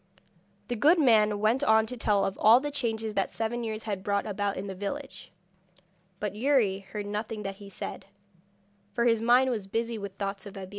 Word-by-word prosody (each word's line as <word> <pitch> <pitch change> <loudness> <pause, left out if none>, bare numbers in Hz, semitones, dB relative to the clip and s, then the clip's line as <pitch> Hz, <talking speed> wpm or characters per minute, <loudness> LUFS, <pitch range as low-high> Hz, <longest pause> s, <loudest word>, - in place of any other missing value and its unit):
The 245 - -2
good 305 +10 +5
man 215 -8 +4
went 225 +6 +2
on 220 -3 +4
to 250 - -6
tell 210 -4 +2
of 195 - -2
all 225 +3 +7
the 290 +2 -4
changes 225 -5 -2
that 195 -2 0
seven 230 +2 -3
years 220 -1 -4
had 200 -3 -3
brought 200 +1 -1
about 205 -1 -2
in 190 - -4
the 195 - -5
village, 205 +9 -6 0.9
but 210 -2 -3
Youri 220 -4 +2
heard 200 +1 -7
nothing 210 +1 -4
that 195 0 -5
he 200 -1 -11
said, 195 - -7 0.9
for 235 -1 +1
his 230 -2 +3
mind 250 +3 +4
was 210 -5 -3
busy 230 +2 -2
with 200 -1 -6
thoughts 200 0 -4
of 200 0 -10
Abeille. 190 -1 -7
215 Hz, 200 wpm, -28 LUFS, 200-235 Hz, 0.9 s, all